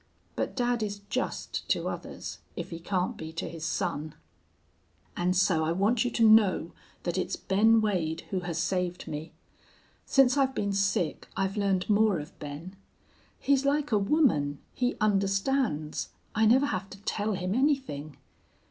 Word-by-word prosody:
But -, -, -2 dB
dad 245 Hz, -2 st, +1 dB
is 205 Hz, -1 st, -3 dB
just 255 Hz, -, -3 dB
to -, -, +1 dB
others, -, -, -6 dB, 0.2 s
if -, -, -6 dB
he 165 Hz, -, -5 dB
can't 180 Hz, +1 st, -1 dB
be 160 Hz, 0 st, -7 dB
to 165 Hz, -, -4 dB
his 165 Hz, -1 st, -8 dB
son. 155 Hz, -2 st, -2 dB, 1.0 s
"And 180 Hz, +1 st, +1 dB
so 170 Hz, -4 st, +3 dB
I 160 Hz, +1 st, +1 dB
want 215 Hz, +6 st, +2 dB
you 245 Hz, -, 0 dB
to 230 Hz, -2 st, +3 dB
know 210 Hz, -6 st, +5 dB, 0.3 s
that 175 Hz, +1 st, -1 dB
it's -, -, -1 dB
Ben 220 Hz, +3 st, +3 dB
Wade 170 Hz, -6 st, 0 dB
who 190 Hz, -, 0 dB
has 175 Hz, -2 st, -4 dB
saved 180 Hz, 0 st, -1 dB
me. 150 Hz, +2 st, -5 dB, 0.8 s
Since 270 Hz, -1 st, +4 dB
I've 270 Hz, -1 st, +2 dB
been 200 Hz, -1 st, -1 dB
sick 195 Hz, -4 st, 0 dB
I've 195 Hz, +1 st, 0 dB
learned 195 Hz, -3 st, +1 dB
more 210 Hz, -2 st, +4 dB
of 150 Hz, +3 st, -9 dB
Ben. 150 Hz, +6 st, -7 dB, 0.6 s
He's 275 Hz, -1 st, +2 dB
like 285 Hz, 0 st, +1 dB
a 210 Hz, -, +4 dB
woman. 195 Hz, -, +2 dB, 0.2 s
He 250 Hz, 0 st, 0 dB
understands. 195 Hz, -, 0 dB, 0.2 s
I 220 Hz, +1 st, +3 dB
never 260 Hz, +5 st, +5 dB
have 210 Hz, -9 st, -3 dB
to 195 Hz, -, -12 dB
tell 210 Hz, +1 st, -1 dB
him 185 Hz, 0 st, -2 dB
anything. 250 Hz, -, 0 dB
195 Hz, 160 wpm, -28 LUFS, 170-225 Hz, 1.0 s, know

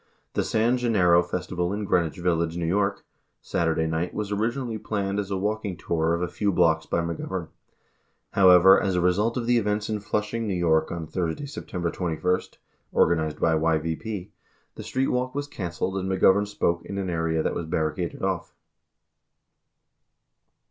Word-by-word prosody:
The -, -, +1 dB
San 115 Hz, +3 st, +2 dB
Gen 120 Hz, -2 st, 0 dB
nero 90 Hz, -4 st, +5 dB
Festival 90 Hz, 0 st, -3 dB
in 105 Hz, +1 st, -3 dB
Greenwich 85 Hz, -5 st, +1 dB
Village, 85 Hz, -1 st, 0 dB
N.Y., 95 Hz, +4 st, +1 dB, 0.5 s
Saturday 80 Hz, -1 st, 0 dB
night 80 Hz, +2 st, -2 dB
was 105 Hz, -1 st, -3 dB
originally 115 Hz, +2 st, -1 dB
planned 100 Hz, -2 st, -2 dB
as 100 Hz, -1 st, -3 dB
a 95 Hz, -, -1 dB
walking 105 Hz, -1 st, -2 dB
tour 80 Hz, 0 st, 0 dB
of 85 Hz, -, -2 dB
a -, -, 0 dB
few 100 Hz, +3 st, -1 dB
blocks 80 Hz, -3 st, +2 dB
by 85 Hz, -, 0 dB
McGovern. 85 Hz, +1 st, -4 dB, 0.8 s
However, 95 Hz, 0 st, +7 dB
as 95 Hz, -2 st, 0 dB
a -, -, +2 dB
result 100 Hz, +7 st, +1 dB
of 120 Hz, -, -2 dB
the 120 Hz, 0 st, +3 dB
events 105 Hz, 0 st, -1 dB
in 105 Hz, -, -1 dB
Flushing, 105 Hz, +1 st, -2 dB
X. 90 Hz, -2 st, -1 dB, 0.3 s
Y., -, -, -4 dB
on 85 Hz, -1 st, -5 dB
Thursday, 85 Hz, -, -3 dB
September 90 Hz, -, -4 dB
21 90 Hz, +1 st, 0 dB, 0.5 s
[organized 80 Hz, -2 st, +2 dB
by 85 Hz, -, +3 dB
YVP], 80 Hz, +5 st, -1 dB, 0.4 s
the -, -, -9 dB
street 130 Hz, +1 st, -1 dB
walk 125 Hz, +1 st, -1 dB
was 145 Hz, 0 st, -2 dB
canceled 95 Hz, -6 st, -4 dB
and 95 Hz, 0 st, -2 dB
McGovern 95 Hz, +2 st, +4 dB
spoke 85 Hz, -4 st, -1 dB
in 100 Hz, -, -6 dB
an 95 Hz, -2 st, -2 dB
area 80 Hz, -1 st, 0 dB
that -, -, 0 dB
was 85 Hz, -, -4 dB
barricaded 80 Hz, +3 st, -2 dB
off. 95 Hz, -2 st, -2 dB
90 Hz, 165 wpm, -25 LUFS, 85-105 Hz, 0.8 s, However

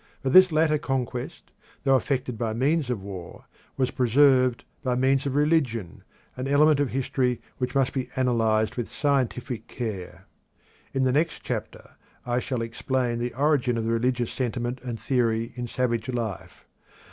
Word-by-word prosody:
But 130 Hz, -, 0 dB
this 185 Hz, -1 st, +8 dB
latter 155 Hz, -1 st, +3 dB
conquest, 125 Hz, -3 st, -4 dB, 0.3 s
though 135 Hz, -1 st, +4 dB
effected 130 Hz, -2 st, -1 dB
by 110 Hz, 0 st, -2 dB
means 140 Hz, +4 st, +1 dB
of 115 Hz, -6 st, -2 dB
war, 95 Hz, -4 st, -9 dB, 0.3 s
was 130 Hz, -2 st, +1 dB
preserved 130 Hz, 0 st, +4 dB, 0.2 s
by 130 Hz, -4 st, 0 dB
means 135 Hz, +2 st, +2 dB
of 135 Hz, -, -2 dB
religion, 140 Hz, -, 0 dB, 0.3 s
an 130 Hz, +1 st, -4 dB
element 145 Hz, +1 st, +4 dB
of 145 Hz, -3 st, +1 dB
history 125 Hz, -1 st, 0 dB, 0.2 s
which 125 Hz, +1 st, -2 dB
must 135 Hz, -2 st, +2 dB
be 130 Hz, -2 st, -3 dB
analysed 110 Hz, -4 st, +1 dB
with 120 Hz, -, -3 dB
scientific 125 Hz, -5 st, -1 dB
care. 105 Hz, -7 st, -6 dB, 0.7 s
In 135 Hz, -, 0 dB
the 130 Hz, -, +3 dB
next 155 Hz, +5 st, 0 dB
chapter -, -, -6 dB, 0.3 s
I 120 Hz, 0 st, 0 dB
shall 125 Hz, -2 st, -2 dB
explain 120 Hz, +1 st, -1 dB
the 120 Hz, 0 st, -3 dB
origin 135 Hz, -4 st, +2 dB
of 115 Hz, -, -1 dB
the 115 Hz, -, -1 dB
religious 120 Hz, +1 st, 0 dB
sentiment 120 Hz, 0 st, -3 dB
and 120 Hz, -3 st, -5 dB
theory 115 Hz, -3 st, 0 dB
in 120 Hz, 0 st, -5 dB
savage 120 Hz, -1 st, -1 dB
life. 115 Hz, -6 st, -5 dB
125 Hz, 160 wpm, -26 LUFS, 115-135 Hz, 0.7 s, this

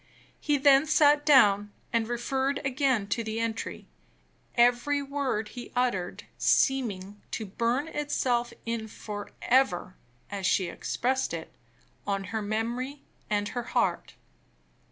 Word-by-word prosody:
He 295 Hz, -1 st, +1 dB
then 275 Hz, +1 st, +5 dB
sat 295 Hz, -1 st, +4 dB
down, 205 Hz, -7 st, +5 dB, 0.2 s
and 230 Hz, -1 st, +1 dB
referred 265 Hz, +3 st, -1 dB
again 260 Hz, -5 st, +1 dB
to 230 Hz, -, 0 dB
the 220 Hz, 0 st, -3 dB
entry, 230 Hz, -1 st, -3 dB, 0.7 s
every 245 Hz, +4 st, +3 dB
word 275 Hz, -6 st, -2 dB
he 245 Hz, -1 st, -9 dB
uttered 240 Hz, -8 st, -1 dB, 0.2 s
seeming 205 Hz, -7 st, +1 dB
to 220 Hz, -, -4 dB
burn 235 Hz, +8 st, -1 dB
itself 255 Hz, -6 st, 0 dB
in 230 Hz, -1 st, -3 dB
forever 210 Hz, -1 st, -1 dB, 0.4 s
(as 195 Hz, -2 st, -1 dB
she 185 Hz, -3 st, +2 dB
expressed 260 Hz, -6 st, -1 dB
it) 160 Hz, -, -8 dB, 0.5 s
on 195 Hz, -1 st, 0 dB
her 220 Hz, -, 0 dB
memory 235 Hz, +7 st, -3 dB, 0.3 s
and 205 Hz, -1 st, 0 dB
her 245 Hz, -, -3 dB, 0.2 s
heart. -, -, 0 dB
240 Hz, 120 wpm, -28 LUFS, 210-270 Hz, 0.7 s, then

